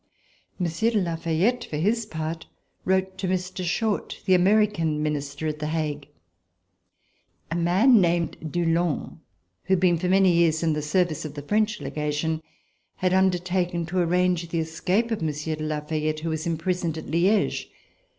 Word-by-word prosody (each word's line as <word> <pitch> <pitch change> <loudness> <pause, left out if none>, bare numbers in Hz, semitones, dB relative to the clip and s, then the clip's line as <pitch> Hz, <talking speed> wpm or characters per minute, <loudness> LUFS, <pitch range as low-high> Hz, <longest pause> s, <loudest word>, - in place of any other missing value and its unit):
Monsieur 180 +5 0
de 225 -3 +1
La 170 -3 -1
Fayette, 170 +9 0
for 150 - -5
his 215 +7 0
part, 160 -2 -5 0.4
wrote 190 0 0
to 190 - -2
Mr. 185 0 -2
Short, 205 +5 -1
the 190 - +4
American 185 -5 +3
Minister 145 0 -3
at 150 -1 -2
The 150 - -2
Hague. 150 -3 -2 1.4
A - - -1
man 195 +8 +5
named 170 -2 +1 0.2
Dulong, 170 -2 0 0.5
who 190 - +1
had 190 - +3
been 175 -2 +3
for 180 +1 -1
many 190 0 +5
years 170 -1 +3
in 160 -1 +2
the 150 - -2
service 160 +1 0
of 150 -2 -7
the 145 - -6
French 210 +6 +1
Legation, 150 +2 -2 0.5
had 185 0 0
undertaken 180 -2 +1
to 180 +3 -2
arrange 180 0 +1
the 170 - -2
escape 180 +8 0
of 220 - -1
Monsieur 155 0 -2
de 155 0 -5
La 155 -1 -2
Fayette 155 0 -2
who 165 - -2
was 160 +1 -3
imprisoned 170 0 -1
at 160 - -6
Liege. 185 +7 +1
170 Hz, 165 wpm, -25 LUFS, 155-185 Hz, 1.4 s, man